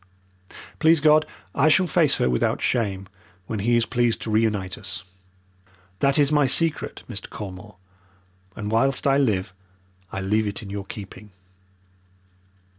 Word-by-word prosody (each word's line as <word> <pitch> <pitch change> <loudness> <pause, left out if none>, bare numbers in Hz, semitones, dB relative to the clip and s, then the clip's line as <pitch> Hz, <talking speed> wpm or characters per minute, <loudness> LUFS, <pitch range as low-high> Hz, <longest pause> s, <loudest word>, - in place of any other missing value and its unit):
Please 160 0 +5
God, 155 +1 +4 0.3
I 140 +2 +3
shall 170 +5 +4
face 165 -5 +3
her - - +1
without 60 -1 +1
shame 100 -6 -1 0.4
when 110 - -4
He 120 +4 +2
is 115 - +2
pleased 120 -2 0
to 110 - -4
reunite 105 -4 0
us! 95 -4 -8 1.0
That 140 0 +2
is 145 -1 +3
my 145 -2 +3
secret, 160 +4 0
Mr. 100 -5 -7
Colmore, 100 0 -9 0.8
and 105 0 -5
whilst 135 +4 +1
I 140 0 +4
live 105 -7 0 0.6
I - - -4
leave 105 +3 0
it 100 +2 -5
in 100 - -8
your 100 -1 -5
keeping." 100 0 -10
110 Hz, 145 wpm, -23 LUFS, 100-140 Hz, 1.0 s, Please